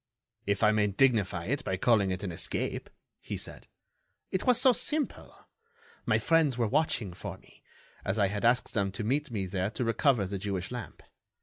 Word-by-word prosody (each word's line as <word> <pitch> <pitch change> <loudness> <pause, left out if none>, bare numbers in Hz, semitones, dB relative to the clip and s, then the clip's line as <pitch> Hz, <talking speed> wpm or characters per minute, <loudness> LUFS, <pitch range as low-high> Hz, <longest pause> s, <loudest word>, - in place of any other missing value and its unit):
"If 100 +1 +1
I 105 - +6
may 105 -1 +2
dignify 100 -5 +2
it 135 +6 -1
by 95 - -1
calling 105 -2 +3
it 95 +1 -3
an 95 - -3
escape," 85 - -2 0.3
he - - -5
said. - - -7 0.6
"It 190 - -2
was 250 -1 +5
so 260 -1 +6
simple! 300 +4 -2 0.6
My - - +4
friends 160 -6 +2
were 115 -2 +1
watching 125 - 0
for - - -7
me, - - -22 0.4
as 95 - -1
I 100 - +4
had 100 +2 -2
asked 120 +2 +2
them 100 -2 0
to 105 - -4
meet 140 +7 0
me 105 -5 -2
there 95 +1 -1
to 115 +3 -3
recover 115 -1 +2
the 95 +1 -4
Jewish 95 -1 -3
lamp. 125 -2 -7
105 Hz, 190 wpm, -29 LUFS, 100-130 Hz, 0.6 s, I